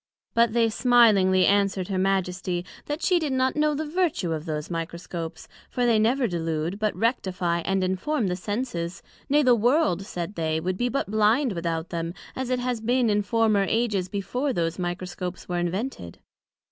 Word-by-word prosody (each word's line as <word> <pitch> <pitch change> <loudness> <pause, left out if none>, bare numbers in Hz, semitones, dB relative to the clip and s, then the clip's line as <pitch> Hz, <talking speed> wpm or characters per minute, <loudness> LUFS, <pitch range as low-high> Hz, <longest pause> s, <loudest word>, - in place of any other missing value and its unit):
But 230 -2 +3
they 230 -1 +3
smilingly 215 -7 +5
answered 195 -1 +2
her 190 -1 -1
Majesty, 180 -2 -1 0.2
That 295 +3 -3
she 360 -2 +3
did 305 -4 -2
not 260 0 +1
know 300 0 +2
the 310 +2 -2
vertue 305 - 0
of 155 0 -4
those 150 +1 -4
Microscopes: 165 0 -5 0.2
for 245 - 0
they 230 -2 +4
never 245 +4 +2
delude, 165 -1 -2
but 215 -1 0
rectifie 185 -7 0
and 195 -1 +1
inform 195 +9 0
the 180 -1 0
Senses; 185 -3 -4 0.3
nay, 295 +2 +4
the 255 -2 +5
World, 240 - +2
said 175 +2 -4
they, 160 -3 -1
would 180 +3 -2
be 245 +6 0
but 250 -5 -2
blind 220 +4 +3
without 165 -1 -3
them, 170 0 -4 0.2
as 260 -1 -3
it 255 - +1
has 245 -2 -2
been 240 0 +2
in 205 0 +2
former 215 -1 +2
ages 215 -5 0
before 235 +8 -2
those 165 -1 -1
Microscopes 180 0 -4
were 175 -1 -1
invented. 175 - -3
200 Hz, 175 wpm, -25 LUFS, 175-245 Hz, 0.3 s, smilingly